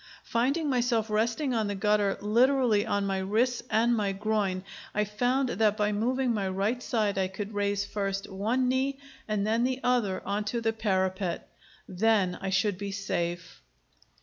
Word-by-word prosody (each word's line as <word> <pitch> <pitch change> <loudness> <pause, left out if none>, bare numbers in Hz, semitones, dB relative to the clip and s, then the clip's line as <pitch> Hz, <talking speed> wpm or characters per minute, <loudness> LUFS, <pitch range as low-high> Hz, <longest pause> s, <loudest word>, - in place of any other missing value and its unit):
Finding 275 +7 0
myself 240 -4 +1
resting 230 +6 0
on 220 -3 0
the 205 - -2
gutter 205 0 +2
literally 235 0 +3
on 200 0 0
my 195 -1 -1
wrists 225 +6 +1
and 235 +2 +3
my 205 -3 0
groin, 200 -2 -1 0.3
I 210 - +2
found 245 +6 0
that 210 +1 +2
by 210 -1 +1
moving 245 +4 0
my 200 -3 -1
right 200 +6 -1
side 210 -5 0
I 190 - +1
could 200 +3 -6
raise 200 0 0
first 195 -1 -3
one 220 +7 0
knee 265 +2 0 0.3
and 210 -2 0
then 225 +2 +1
the 255 +1 0
other 235 -7 +1
on 205 +1 -1
to 235 +3 -1
the 225 -1 0
parapet. 190 -4 -1 0.4
Then 195 -1 +2
I 195 - -2
should 195 0 +1
be 200 -1 -4
safe. 175 -3 -3
210 Hz, 170 wpm, -28 LUFS, 195-235 Hz, 0.4 s, literally